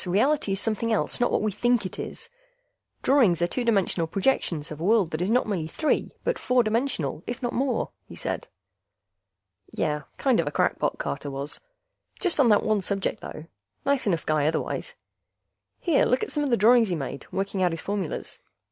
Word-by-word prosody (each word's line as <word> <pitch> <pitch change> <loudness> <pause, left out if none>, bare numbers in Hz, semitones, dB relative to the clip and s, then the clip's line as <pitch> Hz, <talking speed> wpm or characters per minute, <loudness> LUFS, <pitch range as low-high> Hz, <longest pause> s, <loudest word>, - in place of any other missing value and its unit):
Reality 210 +5 +2
is 195 - 0
something 225 +1 -1
else, 220 - +1
not 245 - +3
what - - +1
we 215 - +1
think 240 +2 +1
it 185 - -6
is. 460 - -6 0.8
Drawings 240 - +4
are 175 - +3
two 250 +7 -2
dimensional 195 -7 +2
projections 170 - 0
of 155 - -6
a - - -3
world 200 -3 +3
that 155 - -3
is 180 - 0
not 245 +3 +3
merely 185 -7 -2
three 310 - 0
but - - 0
four 250 -1 +3
dimensional, 215 - -1
if 240 +1 -4
not 240 - -1
more," 260 -1 0 0.2
he - - -10
said. - - -4 1.2
Yeh, 150 0 -1 0.2
kind 265 -7 +2
of 165 - +1
a - - -1
crackpot, - - 0
Carter 70 - -4
was. 140 +2 -5 0.6
Just 360 -5 +1
on 255 -4 +6
that 210 - +5
one 215 -2 +2
subject, 195 0 -2
though; 155 - -8 0.4
nice 280 -4 +1
enough 170 -6 0
guy 150 -1 +2
otherwise. 165 - -2 0.8
Here, 330 -5 +3
look 250 - +2
at - - -4
some 295 - 0
of 285 - 0
the 235 - +3
drawings 230 +1 +5
he 175 - 0
made, 140 -2 -5
working 195 0 -2
out 180 - +4
his 165 -1 -4
formulas. 200 -5 -4
205 Hz, 195 wpm, -26 LUFS, 170-245 Hz, 1.2 s, on